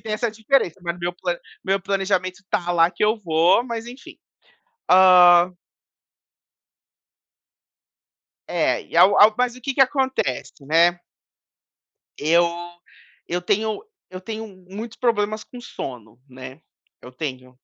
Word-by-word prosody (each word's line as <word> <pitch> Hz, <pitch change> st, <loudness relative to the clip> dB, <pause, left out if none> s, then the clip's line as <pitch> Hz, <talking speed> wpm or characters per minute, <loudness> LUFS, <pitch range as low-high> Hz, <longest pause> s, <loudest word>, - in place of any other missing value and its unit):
Que -, -, -27 dB
tem 220 Hz, -, -5 dB
essa 220 Hz, +2 st, -1 dB
diferença. 220 Hz, -, 0 dB
Mas 170 Hz, 0 st, -4 dB
meu 175 Hz, 0 st, -3 dB
plan 175 Hz, -1 st, -4 dB, 0.2 s
meu 195 Hz, +1 st, 0 dB
planejamento 190 Hz, -1 st, -2 dB
está 190 Hz, -3 st, -3 dB
lá 165 Hz, 0 st, +3 dB
que 205 Hz, -, -1 dB
eu 215 Hz, +2 st, +2 dB
vou, 175 Hz, +2 st, +2 dB
mas 235 Hz, -2 st, -6 dB
enfim. 245 Hz, +3 st, -12 dB, 0.7 s
Hã 180 Hz, -1 st, +6 dB, 2.9 s
É, -, -, 0 dB
e -, -, -9 dB
ao 185 Hz, +4 st, +6 dB
ao 215 Hz, +1 st, +7 dB
mas 250 Hz, -1 st, 0 dB
o -, -, -13 dB
que 270 Hz, +2 st, -4 dB
que 275 Hz, -, -1 dB
acontece, 265 Hz, -, 0 dB
né. 170 Hz, +3 st, +3 dB, 1.2 s
Eu 170 Hz, +3 st, +3 dB, 0.8 s
eu 175 Hz, +1 st, -3 dB
tenho 215 Hz, -, -1 dB, 0.3 s
eu 185 Hz, 0 st, -8 dB
tenho 220 Hz, +3 st, -7 dB, 0.2 s
muitos 220 Hz, +4 st, -8 dB
problemas 215 Hz, -3 st, -1 dB
com 245 Hz, -, -12 dB
sono, 120 Hz, -, -9 dB
né. 130 Hz, +2 st, -11 dB, 0.4 s
Eu 125 Hz, -, -11 dB
tenho 130 Hz, -2 st, -7 dB
185 Hz, 135 wpm, -22 LUFS, 170-220 Hz, 2.9 s, ao